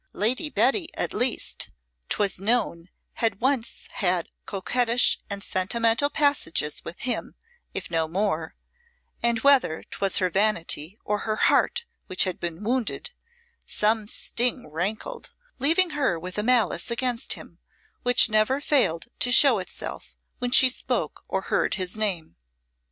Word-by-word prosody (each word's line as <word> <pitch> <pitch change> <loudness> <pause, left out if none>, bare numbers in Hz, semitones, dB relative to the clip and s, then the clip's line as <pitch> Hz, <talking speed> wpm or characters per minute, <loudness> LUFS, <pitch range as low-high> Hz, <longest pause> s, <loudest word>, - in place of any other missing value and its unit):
Lady 250 - 0
Betty, 270 - +2
at - - -2
least, 250 0 -1 0.4
'twas 200 -3 +1
known 195 -5 0 0.3
had 225 -4 +1
once 260 -2 -1
had 180 -3 0 0.2
coquettish 240 +5 +1
and 200 0 -4
sentimental 230 +8 +1
passages 285 - 0
with 170 - -8
him, 250 0 -2 0.4
if - - -4
no 165 -1 0
more; 165 -2 -2 0.7
and 235 -1 +1
whether 270 - +3
'twas 195 -1 +1
her 185 -2 +1
vanity 190 -3 0
or 210 0 -1
her 215 0 -2
heart 475 - +2 0.2
which 185 - +2
had 185 -2 -3
been 170 +3 -5
wounded, 245 - -1 0.6
some 215 0 +2
sting 245 +3 0
rankled, 195 - -3 0.3
leaving 330 +5 +4
her 275 - 0
with 180 +2 -7
a - - +2
malice 225 -7 +2
against 235 0 0
him - - -11 0.4
which 245 -1 +5
never 215 +5 +2
failed 260 - +2
to 245 - +2
show 255 -4 +7
itself 180 - -8 0.2
when 245 - -2
she 260 +1 +7
spoke 255 - -1
or - - -2
heard - - 0
his 185 -1 -2
name. 190 - -2
215 Hz, 140 wpm, -25 LUFS, 185-250 Hz, 0.7 s, show